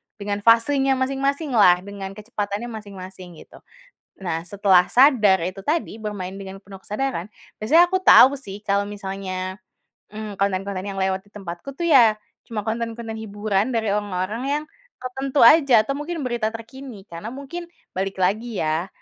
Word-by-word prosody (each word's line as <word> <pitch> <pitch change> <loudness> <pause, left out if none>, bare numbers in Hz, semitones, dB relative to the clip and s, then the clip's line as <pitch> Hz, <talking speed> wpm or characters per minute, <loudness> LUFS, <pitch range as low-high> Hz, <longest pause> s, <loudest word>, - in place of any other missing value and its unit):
dengan 205 -1 -3
fasenya 270 +4 +4
masing-masinglah 265 - +2
dengan 195 -1 -7
kecepatannya 210 +1 -4
masing-masing 190 -4 -9
gitu. - - -17 0.6
Nah 165 -2 -3
setelah 190 -1 +4
sadar 235 - +5
itu 185 +3 -4
tadi 305 -7 -1
bermain 205 -4 -5
dengan 195 0 -9
penuh 195 0 -12
kesadaran 210 -2 -3 0.3
biasanya 325 +11 +4
aku 375 - +2
tahu 275 -3 +8
sih 205 -5 -9
kalau 200 -1 0
misalnya, 190 -2 -5 0.5
mmm, 215 -1 -7
konten-konten 195 -1 -2
yang 195 -1 -5
lewat 190 0 -1
di 205 - -25
tempatku 195 +5 -8
tuh 340 - 0
ya, 230 -8 +5 0.2
cuma 220 -3 -5
konten-konten 230 0 -4
hiburan 210 +1 -1
dari 225 -2 0
orang-orang 205 +2 -3 0.2
yang, - - -9 0.4
tertentu 265 +2 -3
aja 270 -2 +7
atau 275 +5 -3
mungkin 330 +3 -4
berita 235 -3 -1
terkini 230 -1 -10
karena 170 +5 -8
mungkin 280 +7 -7 0.3
balik 195 +1 -2
lagi 215 +4 0
ya, 160 +4 -1
210 Hz, 150 wpm, -22 LUFS, 195-250 Hz, 0.6 s, tahu